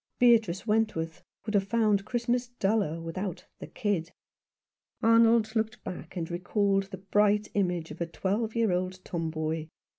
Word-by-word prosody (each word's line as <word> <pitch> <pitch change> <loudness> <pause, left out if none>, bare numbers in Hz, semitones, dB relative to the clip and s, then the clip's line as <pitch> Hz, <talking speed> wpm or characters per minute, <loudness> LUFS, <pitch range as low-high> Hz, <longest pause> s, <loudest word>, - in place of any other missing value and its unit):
Beatrice 225 -7 +4
Wentworth 210 -8 0 0.2
would 215 - -3
have 195 -1 +2
found 210 -3 +2
Christmas 245 +1 0
duller 200 -8 0
without 165 +2 -5
"the - - -7
kid." 185 -6 -2 0.9
Arnold 230 0 +5
locked 220 0 -1
back 180 -1 -7
and 165 -1 -3
recalled 195 +2 +1
the 190 - -7
bright 205 +2 +2
image 180 -5 0
of - - -9
a 170 - 0
twelve 210 +6 -2
year 230 -4 +2
old 185 +1 -2
tomboy. 160 -1 -2
200 Hz, 145 wpm, -29 LUFS, 175-220 Hz, 0.9 s, Arnold